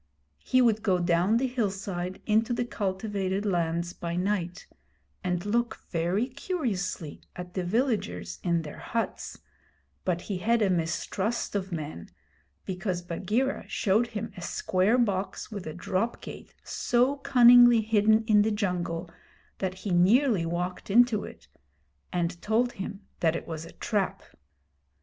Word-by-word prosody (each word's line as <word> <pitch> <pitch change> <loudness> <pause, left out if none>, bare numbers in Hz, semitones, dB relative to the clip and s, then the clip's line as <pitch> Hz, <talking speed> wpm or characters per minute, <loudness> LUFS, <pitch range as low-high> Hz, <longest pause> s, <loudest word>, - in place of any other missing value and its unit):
He 255 - +3
would 220 -2 +3
go 190 -3 +2
down 175 +5 +2
the 260 - +1
hillside 195 -6 -3
into 220 +2 +2
the 240 0 -1
cultivated 195 -2 -2
lands 170 -2 0
by 170 -1 -4
night, 180 -1 -1 0.6
and 180 0 -1
look 235 +2 -1
very 175 +6 +1
curiously 235 - -3
at 180 0 -8
the 185 - -2
villagers 175 - -1
in 170 -2 +1
their 150 - -8
huts, 230 -1 -3 0.7
but 175 -2 0
he 190 -2 -4
had 230 +3 +2
a 195 - +2
mistrust 190 +6 -1
of 195 -2 -2
men 150 - -5 0.6
because 180 -1 -3
Bagheera 210 +10 -1
showed 220 +3 +2
him 225 -2 -5
a 180 - -8
square 185 +6 +1
box 195 -5 -1
with 200 -5 -6
a 155 - -4
drop 190 +5 -1
gate - - -10
so 250 +4 +1
cunningly 240 -3 +7
hidden 220 0 +3
in 215 -2 +5
the 215 - +2
jungle 180 -5 -2 0.5
that 185 -1 -2
he 200 - -1
nearly 195 +1 +4
walked 175 +3 -3
into 230 0 +4
it, - - -12 0.6
and 175 0 -2
told 235 +3 +1
him 195 0 -6 0.2
that 165 -1 +2
it - - -5
was 160 -1 -5
a 165 - -11
trap. 205 -4 -1
195 Hz, 145 wpm, -28 LUFS, 175-225 Hz, 0.7 s, cunningly